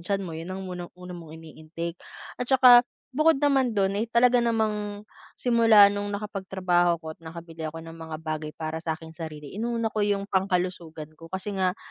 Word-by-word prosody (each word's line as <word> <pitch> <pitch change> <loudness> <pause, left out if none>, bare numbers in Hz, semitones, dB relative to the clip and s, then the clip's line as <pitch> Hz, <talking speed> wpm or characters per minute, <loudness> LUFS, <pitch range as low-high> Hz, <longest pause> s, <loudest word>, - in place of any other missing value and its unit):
tiyan 195 +2 -2
mo, 165 - -6
yun 165 +2 -6
ang 190 +1 -5
muna 180 -1 -6
una 180 0 -9
mong 165 -2 -10
ini-intake 165 +2 -7 0.4
at 245 - -3
saka 250 -2 +8 0.3
bukod 310 +2 +4
naman 270 -5 +2
dun 195 +1 +1
ay 225 - -2
talaga 245 +1 +4
namang 210 -3 -1 0.3
simula 225 -4 +6
nung 205 0 -3
nakapagtrabaho 190 -4 0
ako 160 -1 -8
at - - -22
nakabili 165 -1 -7
ako 165 +1 -8
ng 165 - -9
mga 160 -1 -7
bagay 155 -1 -3
para 160 0 -4
sa 160 -1 -2
akin 160 0 -12
sarili, 155 -3 -8
inuna 230 +1 -2
ko 215 - -1
yung 205 -1 +1
pangkalusugan 180 -5 -2
ko 165 - -11
kasi 190 +3 -4
nga 185 -1 0
185 Hz, 185 wpm, -26 LUFS, 165-210 Hz, 0.4 s, saka